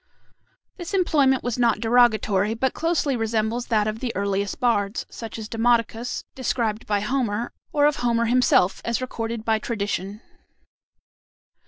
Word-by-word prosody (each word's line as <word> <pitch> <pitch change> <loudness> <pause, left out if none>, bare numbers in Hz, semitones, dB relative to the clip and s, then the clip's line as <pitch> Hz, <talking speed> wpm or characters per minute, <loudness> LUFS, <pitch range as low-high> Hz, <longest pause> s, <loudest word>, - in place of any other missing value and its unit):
This 355 +1 -5
employment 285 -8 +3
was 245 0 -2
not 235 -1 +3
derogatory, 225 -3 +3
but 260 +2 0
closely 325 -4 0
resembles 225 +1 -1
that 215 -3 +2
of 215 +1 -3
the 250 -1 -2
earliest 200 0 -1
bards, 210 -3 0
such 225 -1 -7
as 220 -1 -6
Demodocus, 230 +1 0
described 235 -4 -2
by 205 -1 +1
Homer, 235 -1 -1 0.2
or 290 -1 +3
of 295 -1 +2
Homer 235 -1 +1
himself, 235 -6 +3
as 235 -1 -1
recorded 230 -3 -4
by 220 -1 +2
tradition. 205 -2 -3
230 Hz, 140 wpm, -23 LUFS, 215-245 Hz, 0.2 s, employment